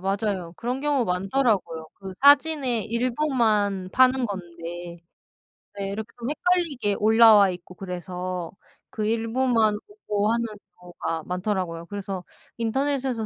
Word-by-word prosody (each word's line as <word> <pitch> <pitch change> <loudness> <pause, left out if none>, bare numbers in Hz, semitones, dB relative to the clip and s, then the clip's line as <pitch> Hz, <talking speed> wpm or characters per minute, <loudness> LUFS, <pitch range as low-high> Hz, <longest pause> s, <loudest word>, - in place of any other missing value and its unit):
맞아요. 195 -2 -2
그런 250 +3 -3
경우 285 -4 +1
많더라고요. 190 -4 0
그 190 -1 -9
사진에 280 -4 +5
일부만 230 -5 0
파는 255 -1 +4
건데 175 -2 -7 0.8
네 195 -1 -4
이렇게 215 +2 -4
좀 235 +3 -3
헷갈리게 310 - 0
올라와 220 -2 +6
있고 180 0 -8
그래서 180 -1 -5 0.4
그 215 - -3
일부만 225 0 +1
오고 215 - -1
하는 235 0 0 0.3
경우가 170 -2 -5
많더라고요. 180 -3 -3
그래서 195 -2 -5 0.3
인터넷에서 260 0 -1
210 Hz, 290 characters per minute, -25 LUFS, 185-250 Hz, 0.8 s, 올라와